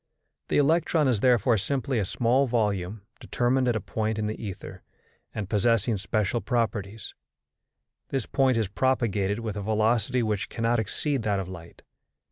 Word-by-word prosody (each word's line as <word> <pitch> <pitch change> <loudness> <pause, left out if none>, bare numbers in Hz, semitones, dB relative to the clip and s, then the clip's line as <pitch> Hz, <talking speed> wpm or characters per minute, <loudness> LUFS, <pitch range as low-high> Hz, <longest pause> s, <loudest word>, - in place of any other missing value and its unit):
The - - +1
electron 155 +1 +3
is 120 -5 +2
therefore 120 -2 +3
simply 135 +2 -1
a 100 - 0
small 125 +7 +2
volume 105 -4 -1 0.2
determined 125 +1 +1
at 120 - +2
a - - +1
point 110 +2 -2
in 110 - -1
the 110 +2 -4
ether, 100 -4 -7 0.5
and 105 -3 -4
possessing 110 +1 +1
special 110 +3 -1
properties; 110 -4 -2 1.0
this 135 -4 -1
point 130 -3 +2
is 110 -3 +1
propagated 105 -3 0
with 110 -2 -4
a 105 - -3
velocity 110 +3 +1
which 105 -3 -1
cannot 115 +1 0
exceed 135 +5 -1
that 105 -2 0
of 95 - -4
light. 85 -2 -11
110 Hz, 155 wpm, -26 LUFS, 105-125 Hz, 1.0 s, electron